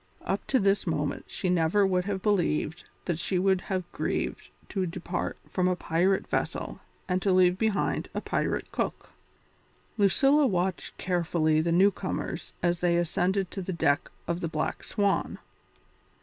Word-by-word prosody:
Up -, -, -2 dB
to 260 Hz, -, +3 dB
this 195 Hz, -1 st, +2 dB
moment 150 Hz, -3 st, -1 dB
she 185 Hz, -, -3 dB
never 180 Hz, +3 st, +3 dB
would 180 Hz, -1 st, +1 dB
have 195 Hz, -2 st, -3 dB
believed 175 Hz, -6 st, 0 dB, 0.2 s
that 170 Hz, -3 st, -1 dB
she 185 Hz, +2 st, 0 dB
would 190 Hz, 0 st, +2 dB
have 185 Hz, -1 st, -2 dB
grieved -, -, -2 dB, 0.2 s
to 190 Hz, -2 st, -1 dB
depart 175 Hz, +1 st, -3 dB
from 180 Hz, -1 st, 0 dB
a 180 Hz, -, +2 dB
pirate 180 Hz, +3 st, +1 dB
vessel -, -, -2 dB, 0.3 s
and 185 Hz, 0 st, 0 dB
to 195 Hz, -, +2 dB
leave 185 Hz, 0 st, +4 dB
behind 220 Hz, -3 st, 0 dB
a -, -, +1 dB
pirate -, -, -2 dB
cook. -, -, -3 dB, 0.9 s
Lucilla 275 Hz, +8 st, +4 dB
watched 185 Hz, -3 st, -1 dB
carefully 165 Hz, -3 st, +1 dB
the 170 Hz, +1 st, 0 dB
newcomers 185 Hz, -1 st, 0 dB
as 175 Hz, -1 st, +2 dB
they 175 Hz, -1 st, +2 dB
ascended 180 Hz, +2 st, 0 dB
to 195 Hz, -, -4 dB
the 185 Hz, -, -4 dB
deck 155 Hz, -1 st, +1 dB, 0.2 s
of 170 Hz, 0 st, -1 dB
the 170 Hz, -, -2 dB
Black 155 Hz, -1 st, -2 dB
Swan. 200 Hz, -1 st, 0 dB
180 Hz, 155 wpm, -28 LUFS, 170-195 Hz, 0.9 s, leave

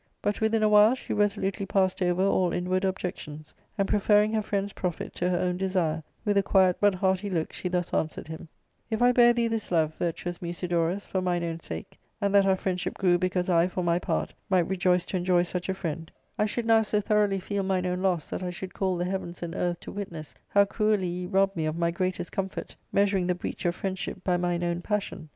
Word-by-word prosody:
But 205 Hz, +1 st, -2 dB
within 220 Hz, 0 st, +2 dB
a -, -, +5 dB
while 210 Hz, +3 st, +6 dB
she -, -, -5 dB
resolutely 200 Hz, -1 st, 0 dB
passed 190 Hz, -1 st, +1 dB
over 180 Hz, +1 st, +2 dB
all 185 Hz, -2 st, +2 dB
inward 185 Hz, +1 st, 0 dB
objections, 155 Hz, -5 st, -4 dB, 0.2 s
and 195 Hz, -1 st, +1 dB
preferring 210 Hz, +1 st, +3 dB
her 220 Hz, -, +2 dB
friend^s 200 Hz, -1 st, -2 dB
profit 180 Hz, -3 st, -4 dB
to 180 Hz, -, +1 dB
her 180 Hz, -, +1 dB
own 180 Hz, 0 st, 0 dB
desire, 180 Hz, -4 st, 0 dB, 0.2 s
with 205 Hz, -1 st, +3 dB
a -, -, +4 dB
quiet 190 Hz, -2 st, +3 dB
but 205 Hz, -2 st, +4 dB
hearty 190 Hz, +2 st, 0 dB
look 165 Hz, -4 st, -2 dB
she 180 Hz, -, -3 dB
thus 180 Hz, -1 st, -2 dB
answered 155 Hz, -, -2 dB
him: 160 Hz, +1 st, -8 dB
— -, -, -46 dB
" -, -, -44 dB
If 220 Hz, +1 st, 0 dB
I 245 Hz, -, +6 dB
bare 240 Hz, -1 st, +6 dB
thee 235 Hz, -1 st, +1 dB
this 225 Hz, -2 st, -3 dB
love, 160 Hz, -2 st, +2 dB
virtuous 175 Hz, +1 st, -3 dB
Musidorus, 175 Hz, +1 st, -1 dB
for 190 Hz, -, -2 dB
mine 175 Hz, -1 st, 0 dB
own 165 Hz, -1 st, -3 dB
sake, 80 Hz, -, -8 dB, 0.2 s
and 200 Hz, 0 st, 0 dB
that 200 Hz, -1 st, +5 dB
our 190 Hz, -, +4 dB
friendship 185 Hz, -1 st, -2 dB
grew 180 Hz, -2 st, +3 dB
because 185 Hz, 0 st, 0 dB
I, 170 Hz, -1 st, +4 dB
for 185 Hz, 0 st, -3 dB
my 170 Hz, 0 st, +2 dB
part, -, -, -2 dB, 0.2 s
might 185 Hz, -3 st, +3 dB
rejoice 180 Hz, -1 st, +2 dB
to 190 Hz, -, -2 dB
enjoy 180 Hz, -1 st, +3 dB
such 180 Hz, +1 st, -4 dB
a -, -, +2 dB
friend, 165 Hz, -3 st, -5 dB, 0.2 s
I 210 Hz, -, +1 dB
should 235 Hz, +2 st, -2 dB
now 225 Hz, -1 st, +5 dB
so 210 Hz, -1 st, 0 dB
tho 210 Hz, +1 st, +1 dB
roughly 200 Hz, -2 st, +2 dB
feel 200 Hz, +2 st, -2 dB
mine 190 Hz, -1 st, 0 dB
own 180 Hz, 0 st, -1 dB
loss 180 Hz, -5 st, 0 dB
that -, -, -3 dB
I 180 Hz, -, -2 dB
should 185 Hz, +1 st, -7 dB
call 190 Hz, -2 st, 0 dB
the 175 Hz, -, -1 dB
heavens 180 Hz, -2 st, -4 dB
and 165 Hz, -1 st, -4 dB
earth 175 Hz, -1 st, -2 dB
to -, -, -8 dB
witness 170 Hz, -7 st, -7 dB
how 200 Hz, 0 st, +4 dB
cruelly 210 Hz, -1 st, +1 dB
ye 180 Hz, +1 st, -3 dB
rob 195 Hz, +1 st, +2 dB
me 160 Hz, -2 st, -1 dB
of 155 Hz, +1 st, -2 dB
my 170 Hz, 0 st, +1 dB
greatest 185 Hz, 0 st, -2 dB
comfort, 195 Hz, -2 st, -4 dB, 0.2 s
measuring 195 Hz, -2 st, +2 dB
the 180 Hz, -, +1 dB
breach 180 Hz, -, -6 dB
of 170 Hz, -, 0 dB
friendship 190 Hz, 0 st, -4 dB
by 180 Hz, -, +2 dB
mine 175 Hz, 0 st, 0 dB
own 175 Hz, 0 st, -1 dB
passion. 195 Hz, -5 st, -3 dB
185 Hz, 235 wpm, -27 LUFS, 175-200 Hz, 0.2 s, while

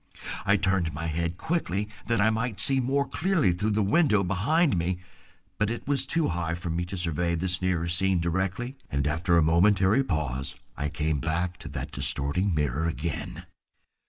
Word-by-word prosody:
I 100 Hz, +1 st, +5 dB
turned 95 Hz, -5 st, +1 dB
my 85 Hz, +3 st, -4 dB
head 85 Hz, +1 st, -2 dB
quickly 105 Hz, -, -1 dB, 0.2 s
that 115 Hz, -1 st, +1 dB
I 105 Hz, +2 st, +4 dB
might 110 Hz, -2 st, -2 dB
see 135 Hz, +5 st, +3 dB
more 135 Hz, +2 st, +1 dB
clearly 165 Hz, -, +2 dB
through 95 Hz, +5 st, -1 dB
the 110 Hz, -, +3 dB
window 105 Hz, -, +3 dB
behind 130 Hz, -, +2 dB
me, 90 Hz, +1 st, 0 dB, 0.6 s
but 105 Hz, -, +2 dB
it 120 Hz, +3 st, -5 dB
was 135 Hz, -2 st, +2 dB
too 165 Hz, +2 st, +1 dB
high 85 Hz, -1 st, -2 dB
for 85 Hz, -1 st, -4 dB
me 85 Hz, +2 st, -1 dB
to 95 Hz, +2 st, -6 dB
survey 85 Hz, 0 st, -1 dB
this 90 Hz, +1 st, -1 dB
nearer 90 Hz, -2 st, 0 dB
scene 95 Hz, +1 st, +1 dB
directly, 95 Hz, +9 st, -2 dB
and 70 Hz, 0 st, -1 dB
after 85 Hz, +4 st, +2 dB
a 85 Hz, -, +5 dB
momentary 95 Hz, -, +4 dB
pause 70 Hz, -, -2 dB, 0.2 s
I 75 Hz, -, -2 dB
came 75 Hz, 0 st, -1 dB
back 85 Hz, +4 st, -1 dB
to -, -, -9 dB
that -, -, -5 dB
distorting 80 Hz, +7 st, 0 dB
mirror 75 Hz, +2 st, 0 dB
again. 85 Hz, -1 st, -4 dB
90 Hz, 180 wpm, -27 LUFS, 85-105 Hz, 0.6 s, I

